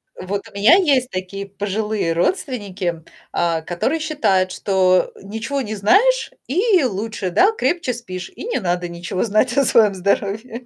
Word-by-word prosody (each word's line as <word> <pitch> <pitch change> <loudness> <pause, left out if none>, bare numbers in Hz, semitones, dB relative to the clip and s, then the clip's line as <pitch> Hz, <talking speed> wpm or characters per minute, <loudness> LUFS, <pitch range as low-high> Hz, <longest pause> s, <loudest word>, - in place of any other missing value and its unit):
Вот 195 +2 -5
у - - -16
меня 205 +11 +6
есть 275 -9 +2
такие 185 +2 -5
пожилые 205 -2 -2
родственники, 190 - -2 0.3
а, 165 -2 0
которые 175 - -2
считают, 200 -13 +1
что 185 -2 +2
ничего 225 +7 -4
не 215 -3 -4
знаешь 410 - +3 0.2
и 370 - +3
лучше, 210 -4 -2
да, 380 - +4
крепче 345 - -1
спишь, 185 -7 -7
и - - -8
не 470 - -1
надо 175 -3 -1
ничего 175 +2 -3
знать 225 +3 +1
о 280 - +4
своем 215 -4 +4
здоровье. 205 +5 -2
205 Hz, 150 wpm, -20 LUFS, 185-255 Hz, 0.3 s, меня